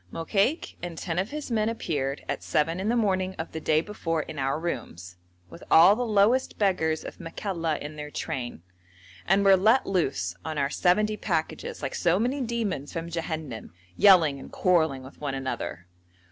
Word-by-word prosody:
Mokaik 200 - 0
and 175 -2 -6
ten 170 0 -2
of 195 +3 -1
his 300 -3 -6
men 220 -1 +1
appeared 145 -11 -3
at - - -3
seven 165 +4 0
in 200 +3 -1
the 240 - +2
morning 190 -4 +1
of 160 - -5
the 160 - -5
day 155 0 +3
before 165 -4 -2
in 155 -1 -8
our 135 +3 0
rooms, 90 - -5 0.3
with 85 -1 -13
all 175 +5 +8
the 245 - -3
lowest 225 +3 +2
beggars 160 -6 +1
of - - -9
Makalla 165 -2 -3
in 150 +1 -8
their 150 0 -6
train, 120 - -5 0.6
and 195 +2 +3
were 195 -1 +8
let 220 +7 +4
loose 130 - -1
on 155 -1 -4
our 140 0 0
seventy 210 +4 +2
packages - - -3
like - - -3
so 175 0 +2
many 250 +6 0
demons 225 - -2
from 165 0 -5
Jehannam, 155 - -5 0.2
yelling 165 -8 +6
and - - -11
quarrelling 160 -7 +2
with 130 +3 -14
one 140 -2 -2
another. 130 -9 -4
170 Hz, 180 wpm, -27 LUFS, 150-200 Hz, 0.6 s, all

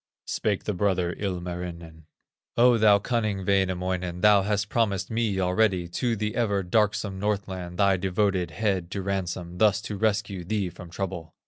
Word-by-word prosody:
Spake 105 -3 -1
the 105 - -2
brother, 90 -2 0
Ilmarinen: 85 -4 -5 0.5
"O 120 0 +5
thou 105 -2 +6
cunning 105 -3 -1
Wainamoinen, 90 -2 0
Thou 105 -1 +6
hast 105 0 0
promised 100 -4 0
me 110 -4 0
already 90 -1 +2
To 120 +6 -1
the 105 0 -3
ever 100 -5 +1
darksome 100 0 0
Northland, 95 -4 -3
Thy 100 -1 +4
devoted 95 -1 0
head 95 -1 -1
to 100 0 -4
ransom, 90 -2 -3
Thus 105 -2 +4
to 105 -1 -5
rescue 100 -3 0
thee 100 0 -1
from 90 0 -11
trouble. 90 -3 -5
95 Hz, 150 wpm, -26 LUFS, 90-105 Hz, 0.5 s, thou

